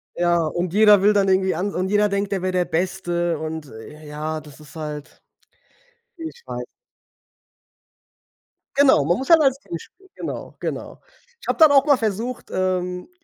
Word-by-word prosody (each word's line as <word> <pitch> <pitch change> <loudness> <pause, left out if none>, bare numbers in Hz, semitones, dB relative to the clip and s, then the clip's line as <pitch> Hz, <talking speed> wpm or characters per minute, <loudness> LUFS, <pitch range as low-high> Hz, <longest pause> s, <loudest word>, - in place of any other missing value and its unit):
Ja, 170 -1 +2
und 175 +2 -3
jeder 210 -2 +6
will 210 +1 +5
dann 200 -1 +2
irgendwie 190 -2 +2
an 195 +4 -2
und 185 +1 -1
jeder 210 0 +3
denkt, 200 0 -1
er 190 - -2
wär 185 0 -1
der 180 -1 +1
Beste 175 -1 -1
und, 160 -1 -5
äh, 150 +7 -12
ja, 155 +1 -4
das 150 -1 -15
ist 150 +1 -15
halt, 150 -2 -7 1.0
ich 330 +8 -8
weiß - - -5 2.1
Genau, 275 - +5
man 175 +4 +1
muss 265 +5 -5
halt 325 -1 +8
als 270 -1 +2
Team 170 - -7
spielen. 385 - -18
Genau, - - -7
genau. - - -5 0.4
Ich - - -13
habe - - 0
dann 315 -3 +7
auch 275 +1 +5
mal 285 -2 +5
versucht, 225 +2 -3
ähm, 180 - -2
185 Hz, 170 wpm, -22 LUFS, 160-210 Hz, 2.1 s, halt